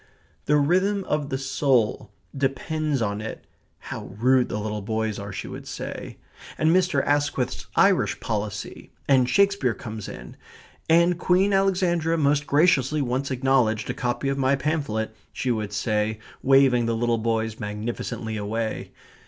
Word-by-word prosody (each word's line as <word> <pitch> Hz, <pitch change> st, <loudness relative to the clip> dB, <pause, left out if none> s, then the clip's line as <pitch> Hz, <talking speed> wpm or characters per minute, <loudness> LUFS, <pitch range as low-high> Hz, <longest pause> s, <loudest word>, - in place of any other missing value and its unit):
The 150 Hz, -, +3 dB
rhythm 185 Hz, +7 st, +2 dB
of 150 Hz, -4 st, -2 dB
the 135 Hz, -, -1 dB
soul 130 Hz, -6 st, +1 dB, 0.3 s
depends 140 Hz, +1 st, -1 dB
on 100 Hz, 0 st, -2 dB
it 110 Hz, -, -7 dB, 0.3 s
("how -, -, -7 dB
rude 125 Hz, +2 st, +3 dB
the -, -, -2 dB
little 105 Hz, 0 st, -3 dB
boys 110 Hz, 0 st, -2 dB
are!" 100 Hz, 0 st, -6 dB
she 95 Hz, -, -6 dB
would -, -, -8 dB
say), -, -, -6 dB, 0.4 s
and 155 Hz, +1 st, +3 dB
Mr. 180 Hz, -7 st, +2 dB
Asquith's 145 Hz, -3 st, 0 dB
Irish -, -, +3 dB
policy, 105 Hz, -2 st, -4 dB, 0.2 s
and 130 Hz, -3 st, +4 dB
Shakespeare 200 Hz, -, +2 dB
comes 110 Hz, -3 st, -7 dB
in, -, -, -10 dB, 0.5 s
"and 170 Hz, +1 st, +4 dB
Queen 190 Hz, +3 st, +3 dB
Alexandra 180 Hz, -4 st, +2 dB
most 145 Hz, -1 st, +2 dB
graciously 145 Hz, -2 st, +3 dB
once 130 Hz, +2 st, -2 dB
acknowledged 130 Hz, -4 st, +1 dB
a -, -, -4 dB
copy 125 Hz, +3 st, -2 dB
of 135 Hz, 0 st, -1 dB
my 135 Hz, +1 st, +3 dB
pamphlet," 130 Hz, -7 st, -2 dB, 0.2 s
she 130 Hz, -, -1 dB
would 110 Hz, -3 st, -2 dB
say, 110 Hz, -1 st, 0 dB, 0.2 s
waving 135 Hz, -3 st, +4 dB
the 115 Hz, -, 0 dB
little 120 Hz, 0 st, +1 dB
boys 110 Hz, -1 st, -1 dB
magnificently 110 Hz, +1 st, -4 dB
away. 110 Hz, +2 st, -3 dB
130 Hz, 145 wpm, -24 LUFS, 110-150 Hz, 0.5 s, and